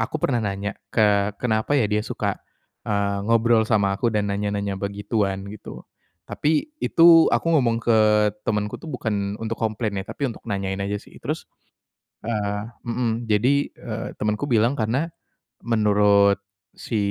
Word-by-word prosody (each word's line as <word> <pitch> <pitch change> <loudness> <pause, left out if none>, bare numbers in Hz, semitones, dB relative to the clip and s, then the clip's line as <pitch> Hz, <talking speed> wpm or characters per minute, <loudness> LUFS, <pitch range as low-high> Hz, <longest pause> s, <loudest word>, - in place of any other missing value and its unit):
aku - - -1
pernah 135 -5 0
nanya, 100 -1 -3 0.2
"Ke 105 -1 +2
kenapa 110 +4 0
ya 130 - +3
dia 105 0 +1
suka, 105 - -3 0.5
eee, 100 -1 0
ngobrol 115 -1 +3
sama 100 -3 +2
aku 120 +5 0
dan 105 -2 0
nanya-nanya 100 -1 -2
begituan?" 100 -1 -2
Gitu. 105 - -10 0.4
Tapi, 155 - -1
itu 165 -1 +6
aku - - 0
ngomong 125 -7 +3
ke 115 -2 +4 0.5
temanku 105 -1 -1
tuh 165 - -9
bukan 105 -7 -2
untuk 110 0 -5
komplain 110 -2 -1
ya, 95 - -7
tapi 140 - -4
untuk - - -10
nanyain 100 -1 -2
aja 100 +1 -2
sih. 105 - -13
Terus - - -4 0.8
eee, 105 -2 -2 0.2
mhm, 115 -1 -1
jadi, 110 +6 +3 0.2
eee, 115 -1 -5
temanku 105 +5 0
bilang 115 +2 +3
karena, 120 +8 0 0.6
menurut 105 -3 +4 0.4
si, 115 - -4
105 Hz, 145 wpm, -23 LUFS, 100-115 Hz, 0.8 s, itu